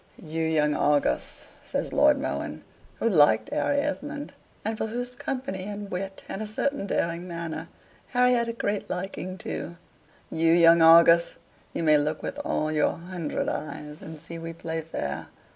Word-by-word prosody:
"You 160 0 -3
young 155 -2 +2
Argus!" 145 - +1 0.2
says - - -3
Lord - - +5
Mohun, - - -4 0.3
who - - -1
liked 175 - +4
Harry 290 -1 +1
Esmond 290 0 -3 0.3
and 220 +1 -1
for 220 - -2
whose 245 +2 -4
company 245 -8 -4
and 205 -1 -6
wit, 195 +1 -4
and 195 - -4
a 215 - -3
certain 215 +1 -1
daring 170 -1 -1
manner, 165 -2 -5 0.4
Harry 250 0 +3
had 235 -1 +1
a 230 - -2
great 205 -3 -2
liking 185 0 -4
too 170 -1 -5 0.5
"You 165 0 +3
young 170 0 +7
Argus! 170 +1 +7 0.4
you - - -3
may 155 -2 +6
look 150 +1 -2
with - - -4
all 155 0 -1
your 155 -1 +2
hundred 170 -2 -4
eyes 150 0 -5
and 160 -1 -9
see 165 +2 -8
we 165 0 -6
play 165 0 -4
fair. 150 - -4
170 Hz, 165 wpm, -26 LUFS, 160-220 Hz, 0.5 s, young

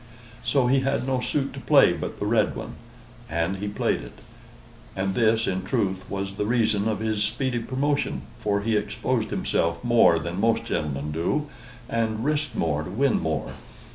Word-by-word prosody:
So 135 -3 +2
he 135 +2 +4
had 135 0 0
no 130 -1 0
suit 140 +1 -1
to - - -7
play - - +5
but - - -5
the - - -2
red 110 0 +2
one, - - -6 0.6
and 85 +4 -1
he 105 +2 -4
played 100 - 0
it; - - -11 0.8
and 95 0 -1
this, 115 0 +3
in 95 0 -1
truth, 95 -4 -1
was 100 0 -4
the 105 - 0
reason 110 -3 +2
of 110 -2 -1
his 110 -2 0
speedy 120 +4 0
promotion; 130 - -1 0.2
for 100 -1 0
he 110 +1 0
exposed 105 - -1
himself 85 +3 0
more 120 -8 +5
than 85 +3 -4
most 115 0 +2
gentlemen 75 0 -2
do, 120 - -1 0.4
and 115 -1 -1
risked 150 -2 0
more 75 -3 0
to 80 - -6
win 130 +7 +2
more. 80 -1 -2
110 Hz, 175 wpm, -25 LUFS, 95-125 Hz, 0.8 s, play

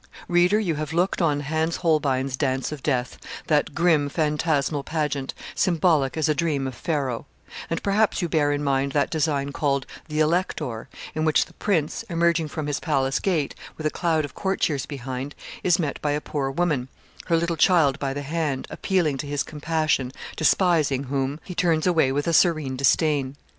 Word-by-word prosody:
Reader, 175 +3 +4
you 180 -6 0
have 155 0 -4
looked 180 +3 +1
on 150 -4 +2
Hans 160 +3 -1
Holbein's 140 -6 +1
'Dance 130 -1 -1
of 150 -3 -6
Death,' 125 -3 -1 0.3
that 150 -2 +1
grim, 165 -4 +3
phantasmal 150 -2 0
pageant, 145 -4 -2 0.2
symbolic 165 -6 +2
as 155 - +2
a 155 - +3
dream 150 -3 0
of 130 - -3
Pharaoh; 135 -3 -2 0.4
and 165 - -2
perhaps 205 +2 +2
you 175 - 0
bear 150 -3 +2
in 145 0 -1
mind 140 -1 0
that 145 -1 +1
design 145 -3 0
called 140 -1 0 0.2
'The 150 -1 -3
Elector,' 155 -7 0 0.2
in 155 - -1
which 155 -1 +3
the - - -19
Prince, 165 -7 0
emerging 170 -1 +2
from 150 0 -4
his 145 -1 -1
palace 135 -4 0
gate, 165 -7 0 0.2
with 155 - -6
a 155 - +2
cloud 160 -3 0
of 145 - -10
courtiers 175 -7 -1
behind, 135 0 -5 0.3
is 175 -1 +3
met 155 -6 -2
by 145 -1 0
a 150 - 0
poor 145 -2 -3
woman, 145 -4 0 0.4
her 170 - +3
little 170 0 0
child 155 -4 +4
by 135 -1 -1
the 145 +1 -4
hand, 150 -2 -2
appealing 165 -8 0
to 145 - -4
his 145 -1 -1
compassion, 155 -4 -1 0.2
despising 160 -5 +2
whom, 135 +2 -1
he 180 - -7
turns 165 -3 +1
away 165 -7 +3
with 145 +2 -1
a 170 - +1
serene 155 -6 +3
disdain. 140 0 +2
150 Hz, 180 wpm, -24 LUFS, 140-165 Hz, 0.4 s, Reader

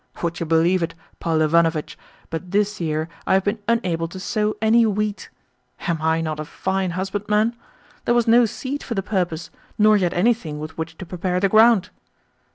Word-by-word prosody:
Would 170 0 -2
you 170 - -3
believe 165 +3 +3
it, 165 - -3 0.2
Paul 160 -2 0
Ivanovitch, 165 0 +2 0.4
but 165 +2 -5
this 205 +1 0
year 155 -1 -1 0.2
I - - +4
have 190 - +2
been 205 +2 -1
unable 180 -8 0
to 185 +3 -9
sow 215 +1 -1
any 225 +2 +4
wheat! 210 -1 -1 0.5
Am 170 -4 -2
I 160 +1 +1
not 155 -1 -3
a 155 - -4
fine 190 +3 -2
husbandman? 210 +4 0 0.5
There 240 - +2
was 240 -1 +2
no 235 +1 +6
seed 270 +6 -5
for 235 - -5
the 195 - -1
purpose, 175 -5 -2 0.3
nor 215 0 +5
yet 180 -3 0
anything 180 -6 +1
with 155 +1 -7
which 160 0 -5
to 190 - -7
prepare 180 +1 -2
the 195 +1 +2
ground. 220 -1 +5
185 Hz, 185 wpm, -22 LUFS, 165-215 Hz, 0.5 s, no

